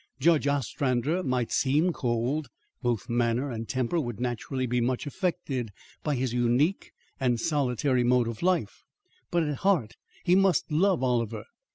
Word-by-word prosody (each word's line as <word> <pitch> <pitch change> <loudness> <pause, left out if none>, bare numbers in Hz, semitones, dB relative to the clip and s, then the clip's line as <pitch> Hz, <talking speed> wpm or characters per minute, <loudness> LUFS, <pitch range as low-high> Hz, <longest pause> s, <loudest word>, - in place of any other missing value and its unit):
Judge 155 0 +3
Ostrander 140 +3 0
might 125 -7 -1
seem 150 +6 +2
cold, 125 +3 -1 0.3
both 120 -5 -1
manner 120 +3 0
and 115 -1 -5
temper 130 +5 0
would 120 -8 -4
naturally 125 +2 -2
be 125 0 0
much 125 +3 -1
affected 145 - -2 0.3
by 150 -2 -1
his 125 -1 -1
unique 125 +9 +1 0.3
and 125 -3 +1
solitary 130 -2 +1
mode 120 -1 +3
of 115 -2 -5
life, 185 0 0 0.5
but 170 -2 +1
at 150 -3 -2
heart 175 - +1 0.3
he 180 - +3
must 190 -3 +3
love 175 0 +2
Oliver. 115 -4 0
130 Hz, 150 wpm, -27 LUFS, 120-155 Hz, 0.5 s, Judge